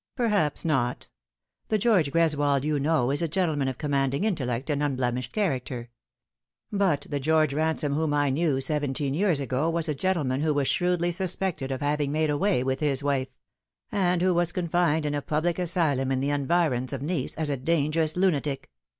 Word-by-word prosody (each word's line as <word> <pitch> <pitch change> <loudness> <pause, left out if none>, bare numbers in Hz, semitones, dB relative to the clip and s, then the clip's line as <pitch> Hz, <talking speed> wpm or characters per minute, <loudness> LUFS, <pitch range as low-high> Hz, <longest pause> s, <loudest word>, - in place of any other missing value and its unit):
" - - -59
Perhaps 210 - +1
not. 130 -6 -1 0.6
The 215 - +1
George 195 -9 +2
Greswold 145 -4 +2
you 150 -1 0
know 140 -3 +1
is 145 - -1
a 170 - +1
gentle 170 -1 0
man 140 -2 0
of 130 - -3
commanding 140 0 0
intellect 135 - -1
and 145 0 -1
unbiemished 125 -3 -1
character. 130 - -2 0.8
But 190 -8 +1
the 145 - -1
George 155 0 +2
Ransome 155 -1 0
whom 155 +1 0
I 145 -1 +2
knew 145 -1 +1
seventeen 145 -1 -1
years 175 -2 +2
ago 140 +3 -1
was 165 0 0
a 155 - 0
gentleman 145 -5 0
who 155 -1 +1
was 140 -2 +1
shrewdly 175 -1 +1
suspected 175 -6 -2
of 130 - -3
having 145 0 0
made 155 0 +1
away 150 -2 +1
with 130 0 -1
his 145 -2 0
wife; 140 -2 0 0.6
and 180 -4 +1
who 185 0 +3
was 175 0 +1
confined 170 -3 +1
in 145 - -1
a 145 - -1
public 160 +4 -1
asylum 160 -7 +1
in 130 - +1
the 140 +2 0
environs 140 -3 0
of - - -4
Nice 150 -3 -1
as 155 -2 -1
a - - 0
dangerous 155 +2 0
lunatic. 150 - 0
150 Hz, 185 wpm, -26 LUFS, 135-170 Hz, 0.8 s, who